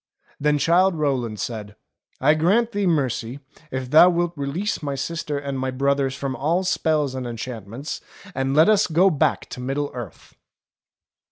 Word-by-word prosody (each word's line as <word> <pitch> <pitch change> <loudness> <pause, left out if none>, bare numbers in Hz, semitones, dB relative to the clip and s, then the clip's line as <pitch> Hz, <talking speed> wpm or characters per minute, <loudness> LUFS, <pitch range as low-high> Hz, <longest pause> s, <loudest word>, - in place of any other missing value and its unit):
Then 150 +1 +2
Childe 175 +5 +3
Rowland 130 -8 -1
said, 105 -3 -5 0.4
"I 150 - +4
grant 200 +10 +2
thee 205 -3 0
mercy 130 -5 -1 0.3
if 130 -2 -5
thou 165 +4 +8
wilt 175 -1 0
release 150 +9 -2
my 140 -2 -3
sister 150 +1 -3
and 140 -1 -4
my 130 0 -1
brothers 135 0 0
from 135 -1 -3
all 160 +8 0
spells 155 -6 0
and 130 -2 -4
enchantments, 115 +2 -6 0.3
and 135 -1 -1
let 155 +2 +6
us 215 -1 +4
go 180 +4 +4
back 155 -1 0
to - - -8
Middle 135 +3 -2
Earth." 120 -8 -9
140 Hz, 160 wpm, -23 LUFS, 130-165 Hz, 0.4 s, thou